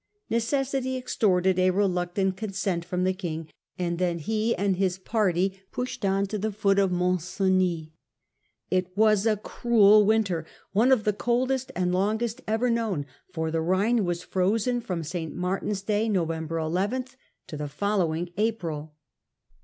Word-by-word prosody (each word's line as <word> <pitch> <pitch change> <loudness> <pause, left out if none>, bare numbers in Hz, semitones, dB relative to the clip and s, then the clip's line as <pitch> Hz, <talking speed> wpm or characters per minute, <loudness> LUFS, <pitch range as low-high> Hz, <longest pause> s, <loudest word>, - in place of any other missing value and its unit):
Necessity 260 +2 0
ex 255 - -5
torted 185 -3 +3
a 185 0 +4
reluctant 185 0 0
consent 195 -3 -2
from 180 +1 -2
the 185 0 +2
king; 165 -4 -5 0.3
and 175 -1 -2
then 175 -2 +1
he 220 +7 0
and 195 -1 +1
his 185 -1 +1
party 190 -2 0
pushed 250 -3 -4
on 195 0 +2
to 210 +1 -4
the 215 +2 -1
foot 200 -1 +2
of 195 -2 +2
Mont 180 0 +1 0.2
Genis. 185 -5 +1 0.8
It 185 0 -1
was 215 -1 +4
a 215 -1 +2
cruel 215 -1 +4
winter—one 205 +2 +1
of 250 -5 +4
the 210 - +1
coldest 255 +4 0
and 180 0 0
longest 220 +6 0
ever 225 +3 +1
kno^^, 220 -11 -1 0.3
for 160 -3 -2
the 165 - 0
Ehine 200 +7 +2
was 175 -1 -2
frozen 220 +6 0
from 180 -7 -3
St. 160 0 -5
Martin's 195 +2 -2
Day 215 +2 0
(November 165 -4 -1
11) 190 +11 -1 0.4
to - - -8
the 150 0 -4
following 175 -1 -1
April. 165 -9 -2
195 Hz, 155 wpm, -26 LUFS, 180-220 Hz, 0.8 s, a